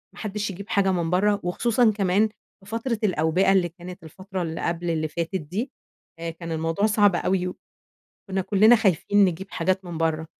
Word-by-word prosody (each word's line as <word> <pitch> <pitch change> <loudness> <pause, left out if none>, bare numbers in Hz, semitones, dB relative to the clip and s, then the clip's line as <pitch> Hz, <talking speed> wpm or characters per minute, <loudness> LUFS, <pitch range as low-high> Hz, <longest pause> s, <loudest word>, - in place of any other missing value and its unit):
حدش 210 -1 -4
يجيب 200 +2 -8
حاجة 200 -3 +2
من 170 -3 -1
برَّه، 200 +3 +2
وخصوصًا 225 +6 +2
كمان 200 +1 +2 0.3
في 195 - -15
فترة 230 +1 -2
الأوبئة 180 0 +2
اللي 185 -3 +3
كانت 175 +1 -11
الفترة 190 +4 -7
اللي 165 -1 -4
قبل 170 0 -2
اللي 155 -1 0
فاتت 170 +4 -4
دي 190 - -3 0.5
آآ 165 0 -4
كان 165 0 -7
الموضوع 165 +5 0
صعب 205 -3 +4
أوي، 180 +1 0 0.6
وكنّا 195 -2 -5
كلِّنا 215 +5 +5
خايفين 205 -1 +3
نجيب 190 +1 -2
حاجات 185 +2 -1
من 175 -2 -6
برَّه، 160 -1 0
185 Hz, 175 wpm, -24 LUFS, 170-205 Hz, 0.6 s, كلِّنا